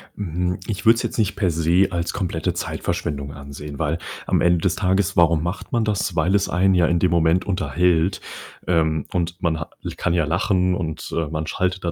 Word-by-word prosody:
Mhm, 90 -1 -2
ich 100 -4 -4
würde 115 +1 +7
es - - -3
jetzt - - -3
nicht 105 -3 +1
per 95 -4 +1
se 85 +4 +3
als 85 -1 -2
komplette 90 -5 -2
Zeitverschwendung 70 -1 -3
ansehen, 70 +1 -9
weil 80 +1 0 0.3
am - - +1
Ende 85 0 +4
des 90 +1 +1
Tages, 95 0 +1
warum 85 -2 +4
macht 85 +3 -4
man 120 -1 +1
das? 100 -4 -1
Weil 90 +4 +2
es 100 - +1
einen 95 +2 +3
ja 85 -2 +4
in 85 0 +2
dem 90 - +2
Moment 85 +1 +3
unterhält, 90 -1 +1 0.5
ähm, 80 -3 +1
und 85 0 -2
man 80 -2 0
ha 80 - -6
l - - -4
kann 85 - 0
ja 85 -3 +2
lachen 90 +2 +1
und, 80 -4 -5
äh, 80 -2 0
man 80 0 -3
schaltet 95 0 -1
da 85 - -1
85 Hz, 210 wpm, -22 LUFS, 80-95 Hz, 0.5 s, würde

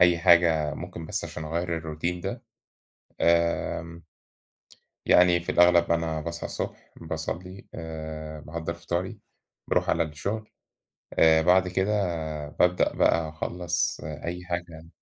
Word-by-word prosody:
أي 90 -1 +6
حاجة 85 -3 +4
ممكن 85 -2 -7
بس - - -2
عشان 80 - -6
أغيّر 85 +2 -2
الروتين 80 +2 -3
ده، - - -5 0.8
آمم 85 0 +1 1.0
يعني 90 -1 +6
في 85 - -3
الأغلب 85 -1 +5
أنا 80 -2 0
باصحى 85 +2 -5
الصبح، - - -5
باصلّي، 85 +4 -5
آآ 80 -1 -6
باحضّر 85 +2 -5
فطاري، 85 +2 -3 0.5
باروح - - +1
على - - +3
الشغل، 100 +8 -4 0.7
آآ، 80 0 +6
بعد 90 +2 +4
كده 95 +3 0 0.6
بابدأ 90 +4 +2
بقى 80 -1 +2
أخلّص 85 +2 -2
أي 85 +4 -5
حاجة. 85 -2 -5
85 Hz, 120 wpm, -27 LUFS, 80-90 Hz, 1.0 s, أي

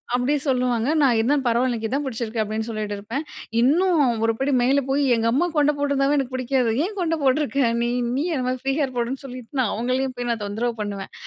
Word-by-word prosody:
அப்படி 250 +3 +1
சொல்லுவாங்க. 250 -3 +1
"நான் 265 -4 +4
இருந்தாலும் 270 +5 +2
பரவால்ல. 240 +2 +2
எனக்கு 225 -2 -2
இதான் 275 +4 -1
புடிச்சிருக்கு." 230 -2 -4
அப்பிடின்னு 220 +1 -3
சொல்லிட்டு 215 -2 -3
இருப்பேன். 225 +9 -4 0.4
இன்னும் 330 +5 +3 0.2
ஒருபடி 230 +5 0
மேல 275 +3 +3
போயி, 280 +2 +2
எங்க 230 0 0
அம்மா 290 +8 +2
கொண்ட 295 0 +4
போட்ருந்தாவே 280 0 +1
எனக்கு 265 -2 -2
புடிக்காது. 255 -2 +1
ஏன் 410 +2 -6
கொண்ட 330 -2 +1
போட்ருக்க 275 0 +1 0.2
நீ? 240 - +1 0.3
நீயும் 325 +6 -1
என்னமாரி 255 -1 -1
ஃபரீ 270 0 0
ஹேர் 270 -3 -1
போடுன்னு 245 +4 -2
சொல்லிட்டு, 250 -3 -9
நான் 240 -5 +1
அவுங்களையும் 255 +3 -1
போய் 245 0 -3
நான் 225 -3 -1
தொந்தரவு 225 +4 -2
பண்ணுவேன். 200 -2 -5
255 Hz, 195 wpm, -23 LUFS, 230-280 Hz, 0.4 s, நான்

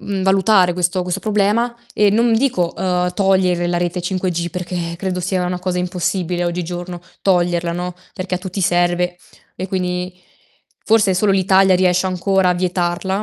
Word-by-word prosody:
uhm, 195 -2 -3
valutare 190 -1 +4
questo 180 +1 0
questo 180 -1 -3
problema 215 +3 +1 0.2
e 205 -1 +4
non 230 +2 +3
dico, 220 -9 +1
uhm, 180 -1 0
togliere 185 -3 +2
la 175 0 0
rete 175 +1 -2
5G 175 -1 -2
perché 175 -1 -4
credo 185 -1 -2
sia 185 0 -1
una 180 0 -3
cosa 180 -1 -2
impossibile 180 0 -1
oggigiorno 175 0 -4 0.2
toglierla, 175 -2 +1
no, 180 +1 -4 0.2
perché 185 -1 -3
a - - -1
tutti 190 +1 -5
serve 175 0 +1 0.4
e 185 +2 -5
quindi 180 -1 -3 0.6
forse 210 -4 +3
solo 200 +2 +2
l'Italia 190 0 +4
riesce 180 0 +2
ancora 185 +1 +1
a 180 - +2
vietarla, 180 +2 -1
180 Hz, 160 wpm, -18 LUFS, 175-190 Hz, 0.6 s, valutare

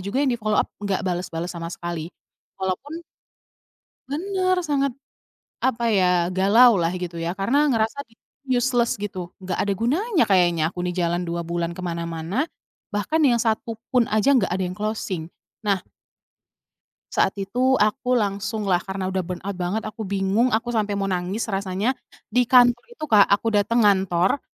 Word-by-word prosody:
juga 200 +9 -1
yang 265 - +2
di-follow-up 215 -3 0
nggak 200 -2 -1
bales-bales 175 -1 -3
sama 170 -1 -6
sekali. 170 -2 -5 0.5
Walaupun 280 - -4 1.1
Bener, 370 +3 0
sangat, 275 -2 +1 0.7
apa 235 -2 0
ya, 185 - +4 0.3
galau 225 +6 +6
lah 165 - +2
gitu 175 -1 -5
ya, 170 +3 -3
karena 280 +10 +2
ngerasa 225 +1 0 0.5
useless 245 -1 +2
gitu, 205 -2 -5 0.2
nggak 185 - -3
ada 200 - +1
gunanya 340 - +1
kayaknya 175 -4 +3
aku - - -12
nih 180 0 -2
jalan 175 0 0
2 170 0 -3
bulan 170 0 -1
ke 185 - -7
mana-mana. 170 +2 -4 0.6
Bahkan 205 +11 0
yang 240 -2 +2
satu 225 +1 -1 0.2
pun 245 -3 +3
aja 215 +4 +1
nggak 200 - +1
ada 185 +1 -1
yang 180 0 -6
closing. 200 -6 -3 0.4
Nah 200 -2 +2 1.4
Saat 195 - +1
itu 250 +7 +1
aku 250 +4 +2
langsunglah 200 -2 0
karena 190 0 -4
udah 190 0 -1
burnout 180 +3 -5
banget 185 +4 -2
aku 215 +1 -6
bingung 200 +4 +1
aku 240 +1 -1
sampai 210 -2 0
mau 195 - -1
nangis 185 +3 -2
rasanya, 195 +3 -1 0.4
di 250 - +5
kantor 245 -1 +6
itu 475 -9 -11
Kak 215 -7 +6
aku 200 +3 +2
dateng 210 +2 +3
ngantor, 190 +3 +2
205 Hz, 155 wpm, -23 LUFS, 185-240 Hz, 1.4 s, galau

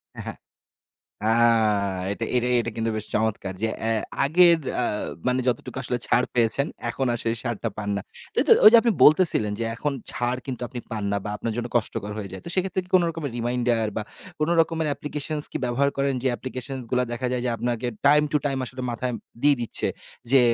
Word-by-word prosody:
হ্যাঁ। - - -7 0.9
আ - - +2 0.8
এটা 115 - -3
এটা 125 0 +1
এটা 115 - -3
কিন্তু 115 0 0
বেশ 110 - -1
চমৎকার 105 -3 0
যে 110 - +2
অ্যা 115 - 0 0.3
আগের 170 +3 +6 0.2
আ - - +1 0.4
মানে 125 0 +2
যতটুকু 120 0 -2
আসলে 125 -1 -1
ছাড় 125 - +3
পেয়েছেন, 120 +3 +2 0.2
এখন 130 +3 -2
আর 120 - -2
সেই 115 - +1
ছাড়টা 120 -2 -2
পান 105 -1 -4
না - - -2 0.3
তাইতো - - +1
ওই 215 - +12
যে - - +10
আপনি 235 - +3
বলতেছিলেন 150 - +5
যে - - 0
এখন 145 +5 -2 0.5
কিন্তু 125 -3 -5
আপনি 125 - -7
ছাড় - - -26
পান 110 -2 -3
না - - +1
বা 105 - -3
আপনার 115 - -3
জন্য 120 -1 -2
কষ্টকর 105 -2 -2
হয়ে 100 -2 -5
যায়। 95 - -8
তো - - -7
সেক্ষেত্রে 185 0 0
কি - - -20
কোন 185 - +6
রকমের 160 -4 -5
reminder 120 -1 0
বা 110 - -1 0.4
কোন 155 - +1
রকমের 160 -1 0
applications 150 +1 -3
কি - - -2
ব্যবহার 125 +3 +1
করেন 140 0 +1
যে 130 - +2
applications 130 +1 -6
গুলা 125 0 +2
দেখা 120 +2 -2
যায় 125 -1 -1
যে 125 - +1
আপনাকে 120 +1 -2 0.2
time 150 +1 +6
to - - +4
time 135 -2 -1
আসলে 130 +1 -7
মাথায় 125 +2 -2 0.3
দিয়ে 145 0 +6
দিচ্ছে 120 - -2 0.4
যে, 135 -1 +7
125 Hz, 200 wpm, -24 LUFS, 115-145 Hz, 0.9 s, ওই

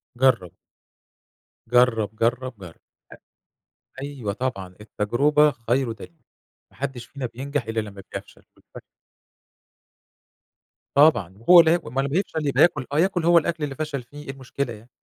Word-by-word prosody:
جرّب. 115 -9 +2 1.1
جرّب، 115 -3 +2
جرّب، 120 +1 -1
جرّب. 90 -4 -11 1.2
أ - - -7
أيوه 135 -8 -4
طبعًا، 100 -6 -4
التجربة 145 +9 +2
خير 120 +1 -1
دليل. 140 +7 -12 0.5
ما - - -23
حدش 135 -2 -5
فينا 140 -2 -6
بينجح 130 +2 -4
إلّا 115 0 -2
لمّا 100 -2 -7
بيفشل - - -9
والف - - -14 2.1
طبعًا 120 - +4
وهو 175 +10 +7
اللي 165 -1 +6
هياكل 175 - +1
ما - - -13
هو - - +1
لما 135 - +1
بيفشل 160 -2 -1
يبقي 140 - +2
ياكل 145 -7 +3
آه 145 - +1
ياكل 175 -1 +1
هو 170 0 +6
الأكل 165 0 0
اللي 140 -2 -3
فشل 150 -3 -4
فيه، 145 +5 -12
إيه - - -11
المشكلة 135 -1 -5
يعني؟ 110 +3 -14
130 Hz, 150 wpm, -23 LUFS, 115-150 Hz, 2.1 s, وهو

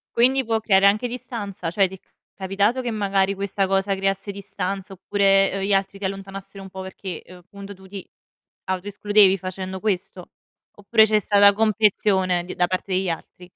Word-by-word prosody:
Quindi, 260 +3 +4
può 225 -1 0
creare 200 -2 +4
anche 215 +5 +2
distanza? 210 -7 -6
Cioè, 190 +3 +2
ti 190 - -10
è - - -17 0.3
capitato 200 +6 0
che 245 - -3
magari 200 -2 +1
questa 195 0 -1
cosa 195 +1 +1
creasse 195 +1 -2
distanza 195 0 -5
oppure, 195 +1 +2
uhm, 195 - -2
gli 195 +1 0
altri 195 0 0
ti 200 - -4
allontanassero 195 0 -7
un 190 - -10
po' 190 0 -8
perché, 190 -2 -7
uhm, 180 0 -13
punto 200 0 -10
tu 190 0 -16
ti 195 0 -9 0.6
autoescludevi 200 +1 +2
facendo 185 +1 -6
questo? 185 -3 -3 0.5
Oppure 220 +2 +4
c'è 215 0 +2
stata 205 0 +5
comprensione 200 -4 +2
di - - -7
da 180 0 +2
parte 185 +1 -3
degli 185 -1 0
altri? 180 +2 -7
195 Hz, 175 wpm, -22 LUFS, 190-205 Hz, 0.6 s, stata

